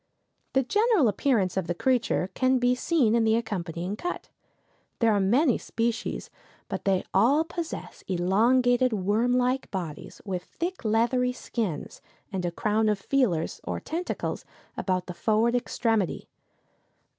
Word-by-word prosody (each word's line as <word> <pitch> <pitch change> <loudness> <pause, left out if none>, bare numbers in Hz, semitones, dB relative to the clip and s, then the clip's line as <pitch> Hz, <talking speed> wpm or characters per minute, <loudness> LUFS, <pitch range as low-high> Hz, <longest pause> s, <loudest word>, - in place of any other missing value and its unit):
The 265 - +3
general 420 - +3
appearance 205 -3 +1
of 185 -3 -1
the 175 - -1
creature 240 -4 +1
can 260 0 +2
be 245 0 +3
seen 250 -3 +2
in 230 -1 +3
the 220 0 +3
accompanying 180 -4 -3
cut. 355 +11 -5 0.7
There 230 -2 +3
are 205 - +2
many 240 +8 +3
species, 230 0 -3 0.4
but - - -5
they 190 -2 +2
all 255 +11 +4
possess 335 0 -6
elongated 240 +7 +3
worm 215 +5 +1
like 250 +1 +1
bodies, 170 -6 -6
with 185 -3 -3
thick 355 0 -5
leathery 240 +3 +2
skins, 215 - -4 0.3
and 190 -1 -2
a 175 - -1
crown 215 +4 +1
of 210 - +1
feelers, 195 - 0
or - - -3
tentacles, 345 +3 -4 0.3
about 185 -2 -1
the 180 - -6
forward 220 +6 +2
extremity. 225 -5 0
225 Hz, 140 wpm, -27 LUFS, 190-255 Hz, 0.7 s, all